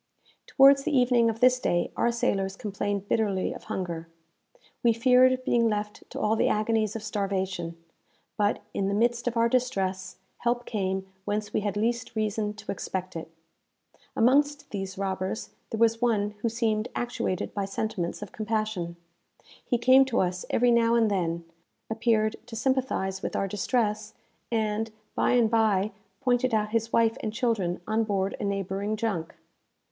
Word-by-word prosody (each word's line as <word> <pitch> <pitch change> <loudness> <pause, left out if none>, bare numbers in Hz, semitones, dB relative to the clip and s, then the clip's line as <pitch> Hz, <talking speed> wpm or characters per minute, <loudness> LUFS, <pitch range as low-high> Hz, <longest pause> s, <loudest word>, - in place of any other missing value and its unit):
Towards 275 0 +6
the 295 -2 +1
evening 245 -2 +4
of 225 0 -4
this 255 0 +5
day 175 -7 0
our 235 - +2
sailors 195 -4 0
complained 200 -1 -3
bitterly 200 -4 0
of - - -11
hunger. 170 -6 -4 0.7
We 235 -1 +4
feared 255 +2 +4
being 230 -1 +3
left 210 0 -4
to - - -6
all 215 +1 +2
the - - +2
agonies 215 0 +1
of 220 - -5
starvation; 190 -5 -2 0.6
but, 205 0 0
in 195 - 0
the 200 - 0
midst 240 +2 +1
of 240 -1 -1
our 230 0 +4
distress, 195 -7 -1 0.2
help 240 0 0
came 190 -3 -2 0.2
whence 210 0 -2
we - - +2
had 205 0 -2
least 235 +2 -1
reason 215 -1 -1
to 215 - -6
expect 185 -1 -4
it. 165 0 -6 0.9
Amongst 285 +4 +2
these 195 -2 -4
robbers 190 +1 -3 0.2
there 225 - -3
was 230 +1 +3
one 210 -4 +2
who 230 - +1
seemed 225 -1 0
actuated 240 -6 -2
by 200 -1 -1
sentiments 195 -2 -3
of 210 - -9
compassion. 215 -5 -2 0.7
He 245 - 0
came 255 +3 +6
to 255 -2 0
us 180 0 -1
every 245 0 +3
now 235 0 +4
and 225 -2 +3
then, 170 -3 -1 0.5
appeared 220 -1 +1
to 235 - -8
sympathize 245 -6 0
with - - -4
our 195 - 0
distress, 210 +1 -1 0.4
and, 220 -1 0 0.2
by - - +2
and 240 -2 +4
bye, 215 -3 +2 0.3
pointed 250 -2 +2
out 210 -1 +1
his 225 0 -1
wife 230 +1 +3
and 215 - -3
children 220 -8 -1
on 220 +1 +1
board 200 -2 -1
a - - -4
neighbouring 200 +1 -2
junk. 200 -8 -2
215 Hz, 160 wpm, -27 LUFS, 195-235 Hz, 0.9 s, Towards